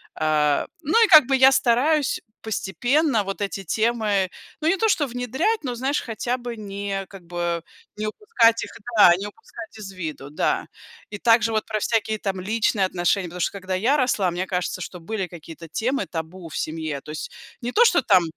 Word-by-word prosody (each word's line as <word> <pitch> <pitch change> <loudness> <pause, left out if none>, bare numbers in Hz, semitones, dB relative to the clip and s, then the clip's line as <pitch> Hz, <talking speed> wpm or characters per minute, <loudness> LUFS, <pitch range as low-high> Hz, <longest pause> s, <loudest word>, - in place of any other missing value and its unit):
А, 150 -2 +1
ну 330 +10 +4
и - - -1
как 310 -6 +9
бы 270 - +3
я 265 0 +7
стараюсь 270 +4 +2 0.2
постепенно 225 - 0
вот 195 0 -5
эти 195 0 -3
темы, 215 -1 +1 0.3
ну, 310 - 0
не 345 - +4
то 445 +3 +2
что 305 -7 +2
внедрять, 260 - -1
но 250 -3 -3
знаешь, 265 +4 -1
хотя 240 +2 -3
бы 240 -1 -6
не 200 -1 -4
как 195 -3 -13
бы, 170 -1 -2 0.3
не 215 0 -2
упускать 230 - +2
их - - -8 0.3
да, 175 -4 +8
не 195 +3 -5
упускать 220 +1 -11
из 205 -2 -8
виду, 155 -6 -6
да. 150 - 0 0.5
И 210 - -6
также 230 -1 +4
вот 215 -1 0
про 215 -1 -2
всякие 220 0 0
там 195 -2 -3
личные 210 0 +1
отношения. 180 +1 0
Потому 175 +1 -7
что - - +1
когда 190 -1 -4
я 235 +10 +2
росла, 215 -8 +1
мне 180 +2 -3
кажется, 180 0 -2
что 180 +1 -7
были 195 +2 -3
какие-то 165 -1 -11
темы 255 - -1
табу 165 +1 -6
в - - -6
семье. 155 -3 -3
То 150 - -10
есть, 155 -1 -6 0.3
не 240 +1 -3
то, 475 +2 +5
что 350 - +4
там, 180 - +4
210 Hz, 195 wpm, -23 LUFS, 180-245 Hz, 0.5 s, как